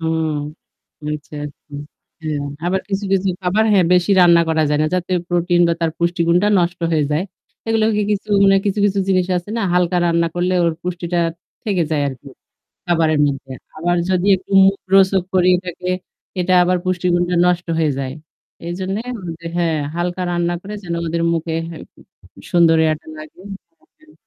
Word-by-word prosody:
হুম 160 -1 -1 0.8
আচ্ছা, 150 0 -8
আচ্ছা। 145 0 -16 0.5
হ্যাঁ 155 -2 -3 0.3
আবার 190 +2 0
কিছু, 200 0 -2
কিছু 195 0 +1
খাবার 195 +4 +1
হ্যাঁ 190 -4 +4
বেশি 180 +2 +3
রান্না 170 -1 +6
করা 160 -1 +2
যায় 150 0 +1
না। - - +2
যাতে 180 0 -2 0.2
প্রোটিন 175 0 +1
বা - - +2
তার 165 -1 +1
পুষ্টিগুণটা 170 +2 +2
নষ্ট 175 0 -1
হয়ে 155 -2 +2
যায়। 155 +4 +1 0.4
এগুলো 225 -1 +2
কি 210 - +1
কিছু 205 0 -2 0.2
মানে 195 0 +5
কিছু, 200 +1 0
কিছু 200 0 0
জিনিস 185 -2 +2
আছে 180 +3 -5
না - - -1
হালকা 180 0 +2
রান্না 170 0 +2
করলে 180 +1 0
ওর 170 - +2
পুষ্টিটা 175 -1 -3 0.5
থেকে 195 -5 0
যায় 150 -2 +1
আরকি 135 +1 -9 0.6
খাবারের 160 -3 +2
মধ্যে। 135 -1 -4 0.3
আবার 175 +3 0
যদি 185 0 +1
একটু 190 +1 -12
মুখরোচক 195 -1 +3
করি 180 -1 +4
এটকে 180 0 -5 0.5
এটা 185 +1 +2
আবার 180 +1 +2
পুষ্টিগুণটা 180 -1 0
নষ্ট 180 0 +1
হয়ে 160 -2 +2
যায়। 130 -1 -3 0.5
এইজন্যে 190 +5 -3 0.4
যে 170 - -9
হ্যাঁ 165 -2 +1 0.2
হালকা 175 +1 -2
রান্না 175 0 0
করে 205 +2 -7
যেন 170 -2 -4
ওদের 165 +1 -1
মুখে 165 -1 -2 1.0
সুন্দর 170 -2 +4
ইয়েটা 155 0 -1
লাগে। 155 +3 -12 0.4
হ্যাঁ, - - -32
হ্যাঁ। 310 0 -22
175 Hz, 165 wpm, -19 LUFS, 165-185 Hz, 1.0 s, রান্না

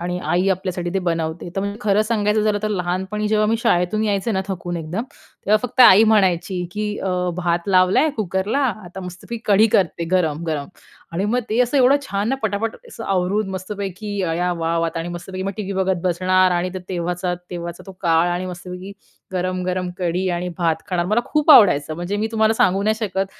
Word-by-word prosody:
आणि 180 +1 -3
आई 180 +2 +1
आपल्यासाठी 180 -2 -2
ते 195 - +2
बनवते 165 -1 -2
तर - - +1
म्हणजे 200 +1 -4
खरंच 210 -1 +2
सांगायचं 210 -1 +1
झालं 210 -1 +1
तर, 215 - 0
लहानपणी 190 +2 -2
जेव्हा 215 0 +2
मी 225 +1 +2
शाळेतून 215 -1 +1
यायचे 205 +2 0
ना, 190 - 0
थकून 175 -2 -4
एकदम 170 +7 -3 0.4
तेव्हा 215 +1 +5
फक्त 255 - -2
आई 220 -2 +9
म्हणायची, 185 -4 +2
की 210 0 -3
अ, 190 -1 -2 0.2
भात 175 +1 -1
लावलाय 185 +11 +4
कुकरला, 200 +5 -1 0.3
आता 180 +2 -9
मस्तपैकी 190 +6 -8
कढी 210 +2 +5
करते, 170 -2 0
गरम-गरम 160 -4 0 0.4
आणि 185 +4 -1
मग 245 +4 +1
ते 220 - 0
असं 250 +3 +2
एवढं 265 +1 +5
छान 200 -3 -2
ना, 270 - +1
पटापट 220 +1 -1
असं 225 - -8
आवरून, 195 +2 0
मस्तपैकी, 200 +1 -5
अया 175 +1 0
वाव! 165 0 -1
आता 165 - -4
आणि 165 - -5
मस्तपैकी 180 +2 -6
मग 195 - -2
टीव्ही 200 -2 -4
बघत 190 -2 0
बसणार 185 +1 +3
आणि 175 +1 0
तर - - -3
तेव्हाचा 180 0 -2 0.2
तेव्हाचा 170 -1 -6
तो 195 - -9
काळ 165 +1 +3
आणि 180 +1 -2
मस्तपैकी 180 +2 -8 0.4
गरम-गरम 185 0 -2
कढी 180 +1 -1
आणि 175 +1 -2
भात 165 -2 0
खाणार. 175 -2 0
मला 215 +4 +2
खूप 300 0 +2
आवडायचं, 155 - +6
म्हणजे 175 +5 -3
मी 215 - 0
तुम्हाला 220 0 +3
सांगू 195 -2 +2
नाही 215 +1 +2
शकत, 195 -2 -1
185 Hz, 190 wpm, -21 LUFS, 175-210 Hz, 0.4 s, आई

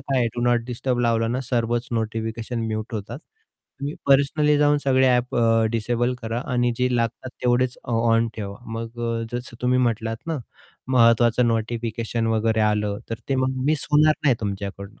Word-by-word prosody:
काय 135 -1 -1
आहे, 120 - +2
do 120 - -3
not 120 -1 +2
disturb 125 0 -2
लावलं 115 -1 +1
ना, 130 - -1
सर्वच 120 0 0
नोटिफिकेशन 115 +1 -3
म्यूट 110 +1 -4
होतात. 110 +5 -5 0.6
तुम्ही 145 +2 -3
पर्सनली 145 +2 +4
जाऊन 145 0 +4
सगळे 130 -1 +4
ॲप 125 0 +1
अ, 115 -1 +3
डिसेबल 120 +2 0
करा 115 +2 -2
आणि 120 0 +2
जे 125 0 +1
लागतात 115 +2 -2
तेवढेच 125 0 +2
ऑ 120 - -4 0.2
ऑन 115 0 +3
ठेवा. 100 -2 -5 0.2
मग 115 +1 -6
अ, 115 -1 -1
जसं 120 -1 -5
तुम्ही 125 +1 +2
म्हटलात 115 -2 0
ना, 160 -3 -2 0.5
महत्त्वाचं 120 0 +4
नोटिफिकेशन 115 0 -2
वगैरे 110 0 +1
आलं, 105 -1 +1
तर - - 0
ते 135 - +1
मग 130 0 -1
मिस 155 -1 +1
होणार 150 +1 +5
नाही 135 -4 +5
तुमच्याकडनं, 100 0 -5
120 Hz, 170 wpm, -23 LUFS, 115-125 Hz, 0.6 s, होणार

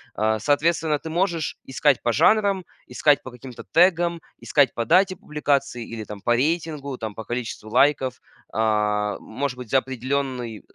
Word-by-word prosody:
А, 110 0 +1
соответственно, 155 +4 +1
ты 160 - -7
можешь 170 -2 -1
искать 135 +1 +2
по 120 - 0
жанрам, 200 - +3 0.2
искать 145 -2 +3
по - - -9
каким-то 125 0 -11
тегам, 170 -1 +3 0.2
искать 145 -5 +2
по 115 - -2
дате 185 - +3
публикации 140 - -1
или 110 -2 -7
там 105 -1 -9
по 120 +4 +2
рейтингу, 150 -1 -1
там 110 -3 -5
по 110 +1 -8
количеству 115 -3 -5
лайков. 135 0 +2 0.3
А, 105 -1 +1
может 125 +3 -4
быть 125 -3 -9
за 135 - +4
определенный, 130 -3 -3
э, - - -22
135 Hz, 160 wpm, -23 LUFS, 115-160 Hz, 0.3 s, за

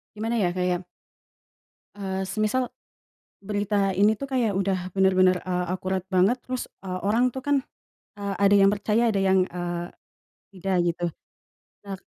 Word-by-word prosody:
gimana 225 +2 -1
ya? 180 -4 +1
Kayak 180 -1 -1 1.1
eee, 190 -1 -3
semisal 215 +6 -1 0.7
berita 205 -1 0
ini 205 +3 +3
tuh 275 - -4
kayak 250 -5 +1
udah 190 -2 -1
bener-bener, 185 -1 +4
eee, 180 0 -2
akurat 185 0 -2
banget 185 +6 +4
terus, 255 -1 -4 0.2
eee, 185 -1 -4
orang 240 +4 +3
tuh 265 - -5
kan, 285 +2 +1 0.6
eee, 200 -1 -3
ada 200 +1 +4
yang 195 0 +6
percaya 210 +3 +1
ada 195 - +1
yang, 190 -1 +3
eee, 175 -1 -4 0.7
tidak 190 +1 -1
gitu. 175 +1 -1 0.8
Nah, 195 - -4
195 Hz, 145 wpm, -25 LUFS, 185-210 Hz, 1.1 s, yang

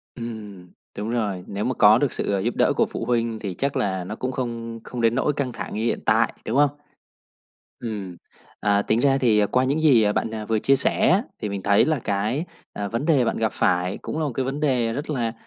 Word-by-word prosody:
Ừm, 105 -6 -8 0.3
đúng 105 +2 -3
rồi. 105 -6 -2
Nếu 100 +1 -4
mà 130 - 0
có 110 0 +6
được 140 -2 0
sự, - - -2
ơ, 100 - +1
giúp 115 +5 -1
đỡ - - +3
của - - +3
phụ - - -5
huynh 115 -1 0
thì 100 -4 -5
chắc 140 +6 -2
là 95 -2 -1
nó 105 +4 -6
cũng 130 +2 -3
không 115 -2 -4
không 125 - -6
đến 115 0 +3
nỗi 135 +3 +1
căng 140 -3 -2
thẳng 110 -4 -6
như 110 - -2
hiện 120 - 0
tại, - - +3
đúng 115 - -1
hông? 145 -1 +5 1.1
Ừm, 100 -6 -5 0.4
à, 100 -1 +2
tính 110 - +1
ra 135 +1 +3
thì, 115 -5 +3
ờ, 105 - +4
qua 125 +5 +1
những 140 +4 0
gì 115 -9 +5
bạn 110 - -1 0.2
vừa 110 -1 +2
chia 135 +5 +3
sẻ 135 - +2
á, 195 +4 +4 0.2
thì 105 - -1
mình 100 -1 -4
thấy 100 +1 +4
là 155 -1 +1
cái, 110 +7 -1 0.3
à, 100 0 -4
vấn 115 +7 -3
đề 145 -7 +4
bạn 115 - -1
gặp 110 -1 0
phải 90 +1 +1
cũng - - -4
là 160 - 0
một 145 - -2
cái 130 +3 -2
vấn 135 +3 -3
đề 125 -6 +1
rất 145 +6 -4
là 120 -6 -1
115 Hz, 245 wpm, -23 LUFS, 105-130 Hz, 1.1 s, có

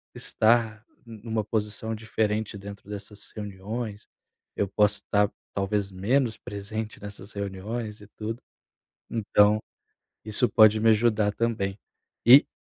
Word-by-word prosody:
estar 110 -1 +2 0.2
numa 110 -1 -3
posição 105 +1 -2
diferente 110 -1 -1
dentro 100 0 -10
dessas 105 0 -8
reuniões. 105 +1 -5 0.5
Eu 100 - +1
posso 105 +1 +2
estar 105 0 +2 0.2
talvez 100 0 0
menos 110 +5 +1
presente 105 +2 -6
nessas 100 0 -8
reuniões 105 +3 -4
e 105 - -12
tudo. 115 +3 -4 0.7
Então, 105 -1 +3 0.6
isso 110 +3 +1
pode 110 -1 +6
me 115 +1 +5
ajudar 110 -2 +3
também. 105 -3 -1 0.5
E 130 +4 +9
105 Hz, 115 wpm, -27 LUFS, 100-110 Hz, 0.7 s, E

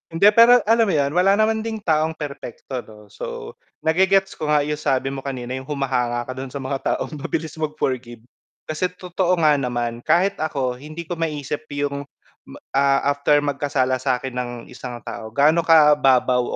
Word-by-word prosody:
Hindi 195 +5 +5
pero, 235 +3 +7
alam 225 +1 +3
mo 190 - +1
'yun, 140 -1 +1
wala 185 +4 +4
naman 220 +1 +2
ding 220 -1 -5
taong 160 -1 +1
perpekto 140 -3 -6
'no. 105 -3 -14
So, 475 -1 -7 0.3
nage-gets 190 +4 +3
ko 155 - -3
nga 150 -1 +3
yung 150 +1 -3
sabi 135 -2 0
mo 135 - -5
kanina 130 -2 -5
yung 130 +1 -5
humahanga 125 -4 -1
ka 130 - -7
do'n 130 +1 -6
sa 140 0 -6
mga 135 +1 -2 0.2
taong - - -5
mabilis 155 +2 -3
mag-forgive. 130 -7 -3 0.4
Kasi 155 +4 -2
totoo 180 0 0
nga 150 -2 +4
naman, 120 -2 -2
kahit 185 +4 +2
ako 130 -5 -2
hindi 155 +4 -8
ko 170 0 -6
maisip 150 -2 -3
yung, 140 0 -3 0.4
ma - - -11
ah, 140 +1 +2
after 145 +1 +2
magkasala 140 -2 0
sa'kin 125 +1 -1
ng 125 -1 -3 0.2
isang 125 -1 -7
tao 110 - -7
gaano 150 +8 +3
kababaw 145 -6 +5
145 Hz, 175 wpm, -22 LUFS, 130-165 Hz, 0.4 s, pero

